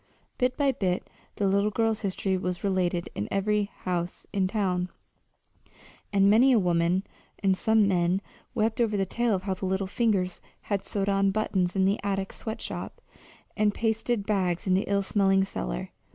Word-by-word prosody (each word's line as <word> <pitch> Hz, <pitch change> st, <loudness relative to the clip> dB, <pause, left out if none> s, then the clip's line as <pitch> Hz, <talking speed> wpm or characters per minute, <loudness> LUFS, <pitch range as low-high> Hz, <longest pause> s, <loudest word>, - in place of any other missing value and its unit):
Bit 250 Hz, 0 st, +1 dB
by 280 Hz, -2 st, +3 dB
bit 190 Hz, -8 st, -1 dB, 0.3 s
the 200 Hz, -, +1 dB
little 200 Hz, +2 st, +2 dB
girl's 225 Hz, 0 st, +1 dB
history 195 Hz, -1 st, -1 dB
was 180 Hz, -1 st, -3 dB
related 180 Hz, -3 st, 0 dB
in 100 Hz, -, -3 dB
every 205 Hz, +1 st, +1 dB, 0.2 s
house 175 Hz, -1 st, -2 dB
in 195 Hz, -2 st, +2 dB
town; 185 Hz, -3 st, 0 dB, 1.2 s
and 195 Hz, -1 st, +4 dB
many 230 Hz, +6 st, +6 dB
a -, -, +5 dB
woman 175 Hz, -1 st, +2 dB, 0.4 s
and 190 Hz, -1 st, +4 dB
some 220 Hz, +1 st, +3 dB
men 180 Hz, -1 st, +2 dB, 0.4 s
wept 220 Hz, +1 st, +1 dB
over 215 Hz, -3 st, +1 dB
the 195 Hz, -, +1 dB
tale 235 Hz, +3 st, +1 dB
of 185 Hz, -, -4 dB
how 195 Hz, -1 st, -1 dB
the 190 Hz, 0 st, -4 dB
little 190 Hz, +1 st, 0 dB
fingers 190 Hz, -3 st, 0 dB, 0.2 s
had 200 Hz, -2 st, -2 dB
sewed 200 Hz, -1 st, -2 dB
on 195 Hz, 0 st, +3 dB
buttons 195 Hz, -3 st, 0 dB
in 190 Hz, -1 st, +3 dB
the 195 Hz, +2 st, +2 dB
attic 195 Hz, -1 st, -2 dB
sweat 220 Hz, +1 st, -6 dB
shop, -, -, -5 dB, 0.6 s
and 210 Hz, -1 st, +2 dB
pasted 225 Hz, -1 st, 0 dB
bags 185 Hz, -5 st, 0 dB
in 185 Hz, -, +2 dB
the 190 Hz, -, +2 dB
ill 200 Hz, 0 st, +2 dB
smelling 195 Hz, -1 st, +3 dB
cellar. -, -, -4 dB
195 Hz, 175 wpm, -27 LUFS, 185-215 Hz, 1.2 s, many